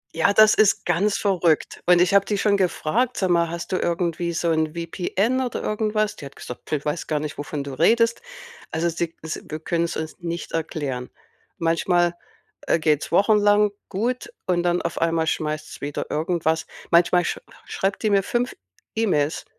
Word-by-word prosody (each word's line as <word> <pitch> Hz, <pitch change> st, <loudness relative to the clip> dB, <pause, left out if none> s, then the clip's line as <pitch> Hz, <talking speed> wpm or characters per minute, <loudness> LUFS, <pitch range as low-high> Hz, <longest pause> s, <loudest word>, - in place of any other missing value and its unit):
Ja, 165 Hz, +5 st, +3 dB
das 215 Hz, +1 st, +6 dB
ist 215 Hz, -2 st, +3 dB
ganz 190 Hz, +4 st, +1 dB
verrückt. 180 Hz, -6 st, +1 dB
Und 180 Hz, -1 st, +6 dB
ich 180 Hz, +2 st, +3 dB
habe 200 Hz, 0 st, +6 dB
die 205 Hz, 0 st, -2 dB
schon 205 Hz, 0 st, +2 dB
gefragt: 200 Hz, +6 st, 0 dB
„Sag 185 Hz, -2 st, +1 dB
mal, 170 Hz, -1 st, +3 dB
hast 170 Hz, 0 st, -6 dB
du 185 Hz, -, +1 dB
irgendwie 170 Hz, 0 st, -1 dB
so 170 Hz, +1 st, 0 dB
'n 160 Hz, 0 st, 0 dB
VPN 190 Hz, +8 st, -1 dB
oder 250 Hz, -3 st, -3 dB
irgendwas?“ 215 Hz, 0 st, 0 dB
Die 145 Hz, -, -10 dB
hat 140 Hz, -, -16 dB
gesagt: 125 Hz, -, -9 dB
„P 150 Hz, -2 st, -3 dB
weiß 150 Hz, +3 st, -2 dB
gar 150 Hz, -, 0 dB
nicht, 150 Hz, 0 st, -6 dB
wovon 145 Hz, 0 st, -4 dB
du 140 Hz, -1 st, -7 dB
redest.“ 230 Hz, -, +3 dB, 0.5 s
Also 165 Hz, +2 st, 0 dB
sie 170 Hz, 0 st, -3 dB
s 160 Hz, -, -5 dB
wir 155 Hz, -, -4 dB
können's 170 Hz, +1 st, -1 dB
uns 160 Hz, 0 st, -5 dB
nicht 170 Hz, -1 st, -5 dB
erklären. 145 Hz, -6 st, -3 dB, 0.5 s
Manchmal, 175 Hz, +1 st, +2 dB, 0.5 s
äh, -, -, +3 dB
geht's 155 Hz, -2 st, +1 dB
wochenlang 210 Hz, 0 st, +4 dB, 0.2 s
gut 235 Hz, +6 st, -2 dB
und 180 Hz, -2 st, +1 dB
dann 175 Hz, 0 st, +1 dB
auf 170 Hz, -, -3 dB
einmal 165 Hz, -1 st, +2 dB
schmeißt's 155 Hz, -1 st, -3 dB
wieder 145 Hz, 0 st, -3 dB
irgendwas 160 Hz, 0 st, 0 dB, 0.2 s
manchmal 175 Hz, +1 st, +4 dB
sch -, -, -2 dB, 0.3 s
schreibt 195 Hz, +3 st, -2 dB
die 215 Hz, -, +2 dB
mir 200 Hz, -1 st, +4 dB
5 240 Hz, +5 st, -1 dB, 0.4 s
E-Mails, 160 Hz, -10 st, 0 dB
170 Hz, 180 wpm, -23 LUFS, 160-200 Hz, 0.5 s, das